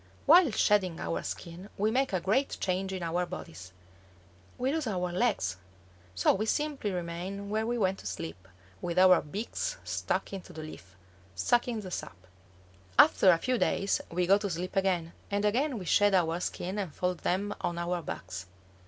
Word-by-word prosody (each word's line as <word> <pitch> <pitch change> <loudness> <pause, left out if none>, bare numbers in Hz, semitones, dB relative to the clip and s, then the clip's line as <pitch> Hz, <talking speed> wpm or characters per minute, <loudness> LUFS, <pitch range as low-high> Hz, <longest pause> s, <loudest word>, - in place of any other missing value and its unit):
While 335 +1 +7
shedding 200 -6 +2
our 85 0 -2
skin 170 - -7
we 215 +2 +2
make 265 +2 +1
a 185 - +1
great 215 +10 +1
change 190 +1 -1
in 185 -2 -4
our 170 +2 0
bodies. 90 - -8 0.9
We 255 +2 0
lose 315 -5 -1
our 180 -4 -1
legs! 215 - 0 0.6
So 90 - +4
we 215 +3 -1
simply 295 -5 -1
remain 185 +3 -4
where 220 +1 0
we 240 +1 0
went 195 -3 +1
to - - -7
sleep, 90 -1 -6 0.3
with 170 - -3
our 185 -1 +7
beaks 220 - -4
stuck - - -2
into 190 -2 -7
the 155 - -7
leaf, 95 - -11 0.4
sucking 235 - +1
the 185 -3 -8
sap. - - -5 0.8
After 190 - +7
a 170 - +7
few 250 +7 0
days 195 - +1
we 180 +1 0
go 195 +3 +5
to 205 -1 -2
sleep 180 +2 -4
again, 180 -4 +1 0.2
and 205 +1 0
again 255 +5 +1
we 190 - -6
shed 205 +3 +4
our 170 -2 +2
skins 185 +2 -3
and 180 -8 -4
fold 180 -1 -1
them 200 +3 -1
on 170 - -2
our 170 0 -1
backs. 90 - -6
185 Hz, 180 wpm, -30 LUFS, 170-210 Hz, 0.9 s, While